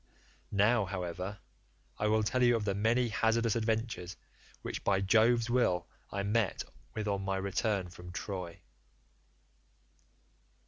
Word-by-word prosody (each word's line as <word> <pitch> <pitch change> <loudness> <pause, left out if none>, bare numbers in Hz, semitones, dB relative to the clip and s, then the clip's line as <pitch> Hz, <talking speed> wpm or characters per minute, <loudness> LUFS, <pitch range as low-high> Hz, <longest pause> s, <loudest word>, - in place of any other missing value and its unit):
Now, 105 +2 +3
however, 90 +1 -4 0.6
I 105 - +1
will 110 0 +3
tell 125 +4 0
you 120 -1 +5
of 110 -2 -1
the 100 - +1
many 115 +4 +2
hazardous 115 +1 +2
adventures 110 -6 -1 0.5
which - - -4
by 100 -1 +3
Jove's 115 +4 +4
will 120 -8 +2 0.2
I 100 0 -2
met 105 0 +1 0.3
with 110 -1 -2
on 100 -1 0
my 95 0 -1
return 100 0 0
from 90 0 -10
Troy. 90 -2 -5
105 Hz, 130 wpm, -32 LUFS, 95-115 Hz, 0.6 s, you